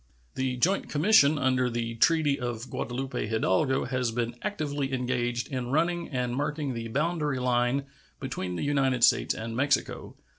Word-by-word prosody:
The 130 -1 -2
joint 185 +10 +1
commission 155 -2 +4
under 130 -2 +1
the 115 -1 -3
treaty 145 +4 +2
of 120 0 -5
Guadalupe 130 -2 -3
Hidalgo 110 +4 +1
has 125 -2 -1
been 120 +1 -2
actively 145 -9 -2
engaged 120 -2 -1
in 130 -3 -3
running 170 +4 0
and 125 -3 -2
marking 145 0 -2
the 115 -1 -5
boundary 150 +2 -1
line 125 +2 +1 0.3
between 95 -9 -4
the - - -3
United 135 -4 +1
States - - +4
and 115 +1 -5
Mexico. 140 +4 -1
130 Hz, 150 wpm, -27 LUFS, 120-145 Hz, 0.3 s, commission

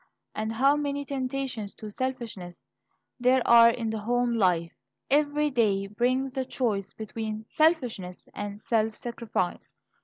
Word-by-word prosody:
And 220 +1 -3
how 270 +5 +4
many 285 -1 -2
temptations 260 -5 -3
to 215 -1 -8
selfishness 225 -8 -5 0.5
there 250 0 +3
are 235 0 +8
in 230 -1 -2
the 220 - -3
home 240 +2 +1
life! 180 -6 +2 0.4
Every 295 +1 +2
day 205 -6 +2
brings 250 +6 0
the 265 -1 -1
choice 220 -7 -2
between 220 0 -5
selfishness 250 - 0
and 205 0 -5
self 220 -1 0
sacrifice. 230 -6 -3
235 Hz, 130 wpm, -27 LUFS, 210-260 Hz, 0.5 s, are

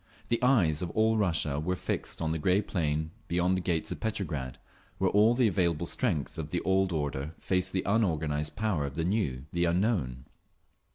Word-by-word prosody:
The 115 - +1
eyes 100 - +3
of 90 - -2
all 110 +1 +3
Russia 80 -8 +1
were 90 +4 -1
fixed 85 - -3
on 80 - 0
the 80 - -1
grey 90 +5 +3
plain 80 -4 -1 0.2
beyond 90 +2 +1
the 95 - -1
gates 85 -2 -1
of - - -4
Petrograd, 75 - -3 0.4
where - - +1
all 110 +3 +5
the 125 -2 +4
available 85 -4 +1
strength 80 - -1
of 75 -1 -4
the 85 - -1
old 95 0 +2
order 75 -1 -3
faced 95 0 0
the 95 - -1
unorganised 80 -8 0
power 95 -10 0
of 70 - -8
the 80 - -1
new, 85 - -1
the 85 0 +1
unknown. 85 - 0
85 Hz, 185 wpm, -29 LUFS, 75-100 Hz, 0.4 s, all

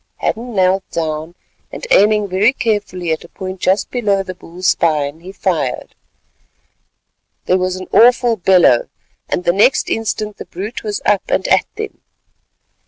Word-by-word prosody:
Hadden 235 +1 -3
knelt 190 0 +2
down, 160 +1 -4 0.4
and - - -7
aiming 210 0 +4
very 200 +6 +2
carefully 205 -8 -2
at 160 - -2
a 170 - -14
point 190 -1 -7
just 190 +3 0
below 205 -6 0
the 185 - -7
bull's 180 +1 -3
spine, 150 -2 0
he 180 +3 -10
fired. 175 -9 -2 1.5
There 185 - +2
was 185 0 -1
an 185 0 -7
awful 240 0 +5
bellow, 180 - +4 0.4
and 180 - -1
the 175 - +2
next 210 +8 +3
instant 215 -1 -2
the - - -8
brute 205 +8 -6
was 210 -2 -4
up 205 -2 +1
and - - 0
at - - +3
them. 435 0 -7
190 Hz, 155 wpm, -17 LUFS, 175-215 Hz, 1.5 s, awful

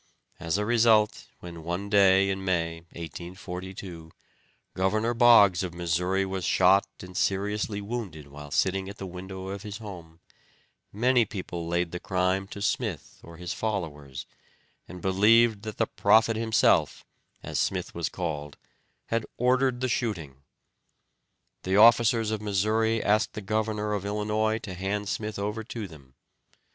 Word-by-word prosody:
As 85 +3 -1
a 105 - -1
result, 110 -2 +3
when, 85 -2 -9
one 90 +4 -3
day 100 -1 +5
in 95 0 -4
May, 85 -3 0 0.2
1842, 90 0 -8 0.6
Governor 110 +6 +1
Boggs 115 -7 +6
of 90 -2 -4
Missouri 90 +3 0
was 95 -1 -4
shot 95 +3 +4
and 90 0 -11
seriously 105 +2 -1
wounded 100 -9 -5
while 75 +1 -11
sitting 95 +5 0
at 100 - -9
the 95 - -6
window 95 +1 -7
of 100 0 -5
his 105 -1 -7
home, 85 -7 -10 0.7
many 120 +3 +3
people 90 -5 -6
laid 85 0 -1
the 90 - -5
crime 95 +1 0
to 100 0 -7
Smith 110 - -2
or 85 0 -13
his 90 +1 -5
followers, 75 -11 -4 0.6
and 90 -1 -10
believed 105 +3 +4
that 110 -2 -7
the - - +2
prophet 110 0 +3
himself, 110 0 +2 0.4
as - - -3
Smith - - -1
was 85 -1 -2
called, 75 -5 -5 0.5
had 115 -1 0
ordered 125 0 +2
the 130 - +1
shooting. 95 - -2 1.2
The 95 +1 0
officers 115 0 +5
of 110 -1 -2
Missouri 110 +2 +1
asked 105 +1 +2
the 105 - -6
governor 105 +1 -1
of 100 -2 -2
Illinois 105 +1 0
to 95 - -6
hand 100 +3 -3
Smith 110 0 -3
over 105 +2 -3
to 110 -3 -6
them. 70 -6 -16
100 Hz, 145 wpm, -27 LUFS, 90-110 Hz, 1.2 s, Boggs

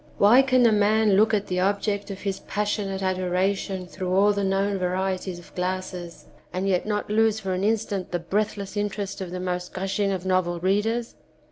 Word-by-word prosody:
Why 225 +6 +7
can 255 -2 +3
a 230 - +6
man 215 +1 +3
look 215 +3 +4
at 205 -2 +1
the 180 -1 -2
object 200 +1 0
of 195 -1 -7
his 195 -2 -2
passionate 205 -2 -2
adoration 185 +1 -1
through 180 0 -5
all 200 +2 +4
the 200 0 -1
known 195 +1 +1
varieties 185 0 -2
of 175 - -14
glasses 180 -1 -4 0.3
and 185 +2 -2
yet 185 +1 +1
not 210 -1 -2
lose 220 0 +3
for 190 -3 -3
an 185 +1 -2
instant 205 -3 0
the 175 - -1
breathless 200 +3 -2
interest 205 -1 -3
of 185 - -4
the 180 +1 -5
most 180 -1 -3
gushing 195 +1 0
of 190 -1 -3
novel 185 -2 +1
readers 210 +6 0
195 Hz, 190 wpm, -25 LUFS, 185-210 Hz, 0.3 s, Why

